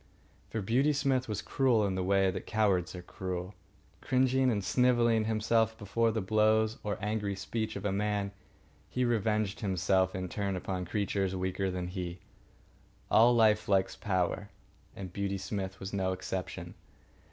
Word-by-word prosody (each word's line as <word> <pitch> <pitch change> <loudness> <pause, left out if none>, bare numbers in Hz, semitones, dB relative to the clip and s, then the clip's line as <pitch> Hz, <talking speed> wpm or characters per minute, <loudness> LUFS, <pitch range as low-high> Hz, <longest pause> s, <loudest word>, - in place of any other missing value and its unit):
For 110 -2 -3
Beauty 130 +9 +2
Smith 135 -3 0
was 105 -1 -3
cruel 125 -6 +2
in 95 - 0
the 95 0 -1
way 95 0 +3
that 90 - -6
cowards 100 -5 +1
are 90 - -7
cruel. 90 +1 -5 0.5
Cringing 130 0 +2
and 105 -4 0
snivelling 120 0 +3
himself 110 0 +1
before 115 +3 +1
the 110 0 -1
blows 110 +2 +2
or 105 -1 -3
angry 105 -1 -2
speech 110 +3 -3
of 100 0 -5
a 100 - +1
man, 100 0 -1 0.6
he 125 0 0
revenged 110 -3 0
himself, 95 -1 +1
in 95 0 -3
turn, 100 +1 -2
upon 90 0 -3
creatures 100 -1 -1
weaker 95 +1 -1
than 90 -1 -3
he. 90 -1 -5 0.9
All 120 +2 +6
life 110 -2 +4
likes 95 -1 +2
power, 95 +1 -1 0.5
and 95 -2 -7
Beauty 100 0 -2
Smith 95 -1 -4
was 95 +1 -6
no 95 -1 0
exception. 95 -1 -5
100 Hz, 155 wpm, -31 LUFS, 95-110 Hz, 0.9 s, All